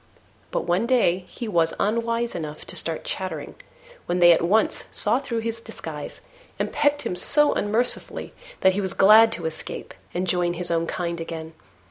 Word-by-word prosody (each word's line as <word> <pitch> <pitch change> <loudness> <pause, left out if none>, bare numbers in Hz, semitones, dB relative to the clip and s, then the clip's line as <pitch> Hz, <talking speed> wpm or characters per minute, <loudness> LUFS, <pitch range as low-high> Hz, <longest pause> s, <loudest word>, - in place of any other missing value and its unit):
But - - -2
one 180 +7 +1
day 190 -8 +2
he 240 - -7
was 165 -5 +1
unwise 230 +2 0
enough 155 -2 -6
to - - -6
start 165 -1 -1
chattering, 175 -6 -5 0.5
when 175 - 0
they 175 -1 +7
at 165 - +4
once 205 +6 +1
saw 225 +4 +5
through 235 -4 -3
his 230 0 -3
disguise - - -8 0.4
and - - -3
pecked 290 0 +2
him - - -3
so 295 +10 +3
unmercifully 220 +4 -2 0.3
that 190 - +6
he 200 +2 -1
was 190 -2 -3
glad 220 +3 +7
to 170 - -5
escape 160 -1 -6 0.2
and 180 +1 -2
join 175 -1 +1
his 175 0 -3
own 165 0 0
kind 170 -1 -3
again. 165 -1 -6
185 Hz, 175 wpm, -24 LUFS, 170-230 Hz, 0.5 s, they